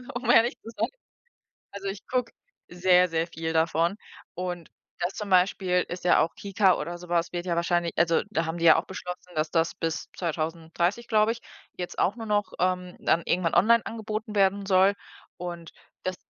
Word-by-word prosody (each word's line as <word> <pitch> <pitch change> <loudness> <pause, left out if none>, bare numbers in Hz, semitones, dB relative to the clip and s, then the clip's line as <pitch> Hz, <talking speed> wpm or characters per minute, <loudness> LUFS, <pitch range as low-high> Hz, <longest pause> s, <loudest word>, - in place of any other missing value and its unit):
um 250 - -3
ehrlich 235 +2 +5
zu - - -10
sein. - - +1 0.9
Also, 200 0 -5
ich 195 0 -6
gucke 250 -2 -1 0.4
sehr, 180 0 +4
sehr 165 0 0
viel 160 -1 -4
davon 165 +3 +1 0.4
und 175 -2 -5 0.3
das 175 +2 -1
zum 210 -1 -5
Beispiel 180 0 +3
ist 175 0 -6
ja 180 - +5
auch 165 - 0
KiKA 195 -2 +2
oder 170 +3 -4
so 180 0 -12
was 170 0 0
wird 175 0 -3
ja 175 -2 -1
wahrscheinlich, 170 0 +1
also, 170 -1 +3
da 165 -6 0
haben 160 +1 -3
die 170 - +1
ja - - +9
auch 165 - -3
beschlossen, 180 -1 -8
dass 155 0 -1
das 165 +1 +1
bis 165 -1 -3
2030, 170 +5 -2
glaube 215 0 +3
ich, 235 - -9 0.4
jetzt 180 -1 -6
auch 195 - +2
nur 225 -1 -7
noch, 205 -1 0
ähm, 180 0 -1
dann 170 - +2
irgendwann 175 -2 +1
online 230 +4 +5
angeboten 215 -1 -5
werden 200 0 +3
soll 195 +1 +4 0.4
und 175 -2 -7 0.3
dass 185 0 -2
180 Hz, 190 wpm, -27 LUFS, 170-200 Hz, 0.9 s, ja